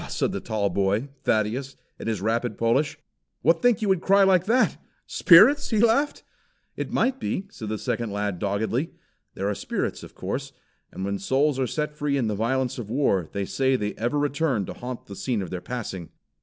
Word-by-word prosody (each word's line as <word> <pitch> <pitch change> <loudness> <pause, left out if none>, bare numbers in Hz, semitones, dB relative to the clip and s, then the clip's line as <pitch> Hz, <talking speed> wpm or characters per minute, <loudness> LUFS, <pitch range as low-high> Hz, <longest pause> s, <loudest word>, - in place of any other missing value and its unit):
said - - 0
the - - -3
tall 110 -3 -1
boy, 100 +7 0 0.2
Thaddeus, 115 +6 0 0.2
in - - -6
his 110 -4 -1
rapid 115 +3 -1
Polish. 115 +6 +1 0.5
"What 165 +1 +4
think 240 -2 +3
you - - +1
would 190 -3 +2
cry 195 +1 +5
like 185 -2 +4
that 245 +4 +2 0.2
spirits?" 220 - +6
He 220 - +1
laughed. 235 +6 +2 0.5
"It - - -4
might 265 0 +1
be," 195 -4 -2
said 110 - -7
the 110 - -2
second 115 +1 -2
lad 100 -3 -2
doggedly. 110 +8 -1 0.4
"There 100 - -2
are 105 - +1
spirits, - - -3
of - - -12
course; - - -4 0.4
and 95 - -5
when 100 0 -2
souls 135 +5 +1
are 130 - +1
set 150 +3 -2
free 145 -1 -1
in 130 - +1
the 110 - 0
violence 125 +4 -1
of 110 -4 -6
war 105 - +1
they 100 -1 -2
say 130 +5 +1
they 105 -4 -2
ever 120 +6 -1
return 145 -6 0
to - - -6
haunt 125 0 -7
the 100 - -9
scene 115 -1 -1
of 90 - -8
their 90 -1 -4
passing." 95 -5 -5
125 Hz, 200 wpm, -25 LUFS, 105-150 Hz, 0.5 s, spirits